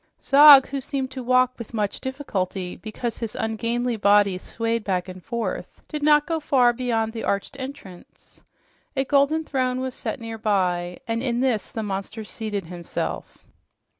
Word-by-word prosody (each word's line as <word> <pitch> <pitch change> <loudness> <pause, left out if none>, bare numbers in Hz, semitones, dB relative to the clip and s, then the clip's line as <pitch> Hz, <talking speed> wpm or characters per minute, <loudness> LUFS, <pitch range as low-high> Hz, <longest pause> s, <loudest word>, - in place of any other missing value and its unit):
Zog, 280 -1 +8
who 275 -1 -3
seemed 270 -1 -3
to 260 0 -6
walk 255 0 +2
with 235 0 -8
much 210 -2 -2
difficulty 195 -9 -3
because 225 +1 -5
his 230 -2 -5
ungainly 230 +2 -1
body 200 -2 +4
swayed 230 +2 -2
back 185 -3 -1
and 185 -1 -9
forth, 235 -1 -4
did 300 -1 -5
not 295 0 +5
go 330 -1 -1
far 255 -5 +3
beyond 230 -3 -1
the 225 - -5
arched 200 +7 -2
entrance. 260 -10 -11 0.6
A 270 - +2
golden 285 +4 +2
throne 255 -4 -1
was 260 -1 -3
set - - -5
nearby, 195 -6 -1
and 230 0 -1
in 245 -2 -1
this 250 -5 0
the 220 - -4
monster 200 +2 -4
seated 210 -3 -5
himself. 175 0 -5
230 Hz, 160 wpm, -24 LUFS, 205-260 Hz, 0.6 s, Zog